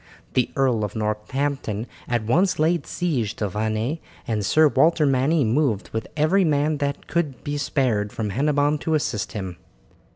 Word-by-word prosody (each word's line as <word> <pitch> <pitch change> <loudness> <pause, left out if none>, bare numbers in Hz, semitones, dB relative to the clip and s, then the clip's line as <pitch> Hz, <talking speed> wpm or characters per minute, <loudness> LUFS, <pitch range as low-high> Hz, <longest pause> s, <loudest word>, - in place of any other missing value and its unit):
The 125 - +2
Earl 130 -5 +2
of 105 +1 -4
Northampton 110 +1 -2 0.2
at 120 -2 0
once 175 - +2
laid 165 +2 +1
siege 130 - -1
to 105 - -2
Vannes, 110 - -2 0.3
and 110 -3 -1
Sir 155 +10 +5
Walter 155 +3 +3
Manny 140 +3 +3
moved 115 -3 +1
with 110 - -3
every 155 +6 +3
man 150 -1 +1
that 140 -1 -2
could 150 -6 -2
be 145 - -3
spared 125 -7 0
from 105 -3 -3
Hennebon 145 +4 +1
to 160 +1 0
assist 110 -8 -2
him. 95 -4 -5
135 Hz, 160 wpm, -23 LUFS, 110-150 Hz, 0.3 s, Sir